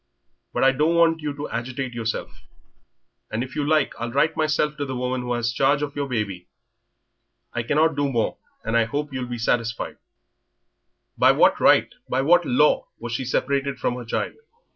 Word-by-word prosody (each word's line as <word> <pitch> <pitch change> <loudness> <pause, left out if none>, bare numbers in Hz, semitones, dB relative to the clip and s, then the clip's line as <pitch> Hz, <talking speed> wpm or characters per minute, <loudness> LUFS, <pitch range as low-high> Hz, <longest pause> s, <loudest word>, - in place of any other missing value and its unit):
But - - 0
I 135 - +6
don't 150 +5 +1
want 165 -1 +4
you 150 -1 -2
to 145 +1 -5
agitate 125 +2 -4
yourself, 115 -1 -3 1.0
and 110 +2 -2
if 130 - -9
you 150 - 0
like 150 -1 +2
I'll 120 0 -3
write 145 +5 +2
myself 155 -1 +1
to 145 - -2
the 130 -1 -4
woman 125 0 -2
who 125 0 -2
has 120 -1 -1
charge 140 +3 +2
of 145 -1 -4
your 145 -1 -2
baby. 105 -8 -3 1.1
I 120 - -1
cannot 150 +6 +2
do 145 -1 0
more, 115 -3 0 0.3
and 115 +1 -2
I 115 -1 +4
hope 145 +4 -4
you'll 130 -2 -3
be 120 0 -4
satisfied." 115 0 -1 1.2
By - - +6
what - - +4
right, - - +4 0.2
by 130 +1 +1
what 175 +3 +4
law, 150 +5 +3
was 120 0 -6
she 130 +2 -2
separated 140 +2 0
from - - -1
her 125 0 -6
child? 115 - -2
130 Hz, 185 wpm, -23 LUFS, 120-145 Hz, 1.2 s, I